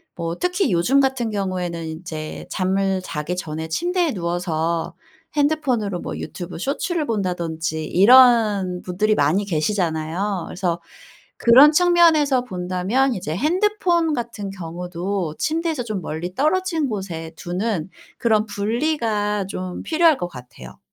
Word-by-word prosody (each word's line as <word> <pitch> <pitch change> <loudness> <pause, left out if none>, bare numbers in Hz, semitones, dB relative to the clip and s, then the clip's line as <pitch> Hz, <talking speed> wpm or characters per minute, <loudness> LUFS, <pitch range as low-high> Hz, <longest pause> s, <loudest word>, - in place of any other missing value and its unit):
뭐 170 -1 -3
특히 360 - +1
요즘 210 +11 +3
같은 265 -4 0
경우에는 180 -4 -3
이제 160 -1 -6
잠을 190 0 0
자기 160 +1 -4
전에 160 -2 -5
침대에 345 - 0
누워서 170 -2 -2 0.4
핸드폰으로 265 - 0
뭐 - - -5
유튜브 175 -1 -7
쇼츠를 300 - -2
본다든지 165 - -2
이런 210 -4 +5
분들이 210 +4 0
많이 170 +7 +2
계시잖아요. 175 +1 -1
그래서 175 -2 -2 0.6
그런 260 +6 +7
측면에서 315 -6 +4
본다면 185 +6 0
이제 160 -4 -4
핸드폰 345 - +1
같은 235 -5 -4
경우도 180 -1 -4
침대에서 320 -3 -1
좀 215 -5 -4
멀리 175 +3 -5
떨어진 325 +1 +1
곳에 175 -6 -5
두는 180 -1 -2 0.3
그런 220 -2 +2
분리가 210 -2 -1
좀 185 -2 -5
필요할 325 -2 +3
것 175 - -3
같아요. 125 - -12
195 Hz, 295 characters per minute, -21 LUFS, 175-265 Hz, 0.6 s, 그런